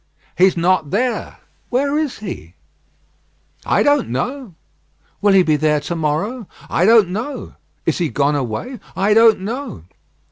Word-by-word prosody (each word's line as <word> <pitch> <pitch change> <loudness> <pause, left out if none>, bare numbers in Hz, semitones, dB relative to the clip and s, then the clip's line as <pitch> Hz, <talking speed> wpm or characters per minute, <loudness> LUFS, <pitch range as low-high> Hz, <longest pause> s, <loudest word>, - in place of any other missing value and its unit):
"He's 185 -1 +3
not 170 -3 +1
there." 240 - -2 0.3
"Where 280 +3 0
is 305 -3 -1
he?" 95 - -8 1.1
"I - - +3
don't 290 -1 +2
know." 240 - -4 0.7
"Will 205 -1 +4
he 190 -1 +6
be 155 -3 +2
there 150 0 +2
to 170 +4 -4
morrow?" 175 +9 -2 0.2
"I 175 - +2
don't 220 -3 +5
know." 220 +10 -5 0.3
"Is - - 0
he 170 -3 0
gone 145 +1 +1
away?" 145 - -4 0.2
"I 200 +2 +2
don't 225 -2 +5
know." 235 - -5
195 Hz, 145 wpm, -19 LUFS, 155-245 Hz, 1.1 s, he